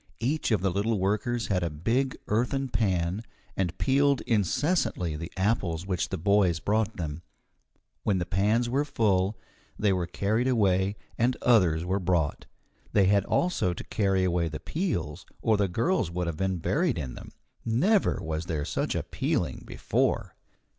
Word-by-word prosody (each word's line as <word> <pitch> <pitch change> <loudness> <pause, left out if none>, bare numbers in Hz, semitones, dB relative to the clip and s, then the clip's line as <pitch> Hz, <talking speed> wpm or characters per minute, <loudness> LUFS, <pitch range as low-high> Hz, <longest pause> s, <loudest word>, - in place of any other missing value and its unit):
Each 140 +8 0
of 110 -6 +2
the 95 -1 +1
little 105 +4 0
workers 110 +5 0
had 95 -3 +1
a 85 - 0
big 115 - -1
earthen 125 +5 0
pan, 95 -4 0 0.3
and 90 -4 -1
peeled 140 0 +3
incessantly 115 - 0
the 85 +3 -6
apples 95 -4 0
which 90 -3 -1
the - - -2
boys 95 -1 +3
brought 110 +3 0
them. 80 -2 -4 0.8
When 100 - +1
the 90 - -1
pans 105 +7 +1
were 135 +4 +1
full, 105 -7 +1 0.4
they 105 -2 +2
were 90 -2 -1
carried 110 +7 0
away 100 -5 +2 0.2
and 120 +2 +2
others 90 -9 +4
were 95 +2 0
brought. 85 -5 0 0.5
They 100 -2 +5
had 100 0 +3
also 175 - +1
to - - -7
carry 95 -3 +1
away 85 -2 +1
the 75 - -6
peels, 90 - -3
or 110 - +2
the 100 -1 +2
girls 115 - 0
would 90 +1 -2
have 85 -2 -3
been 95 0 0
buried 150 - 0
in 65 -6 -4
them. - - -10 0.3
Never 180 - +2
was 80 +1 -3
there 75 -4 -2
such - - -2
a - - -1
peeling - - -2
before. - - -1
100 Hz, 165 wpm, -27 LUFS, 90-115 Hz, 0.8 s, They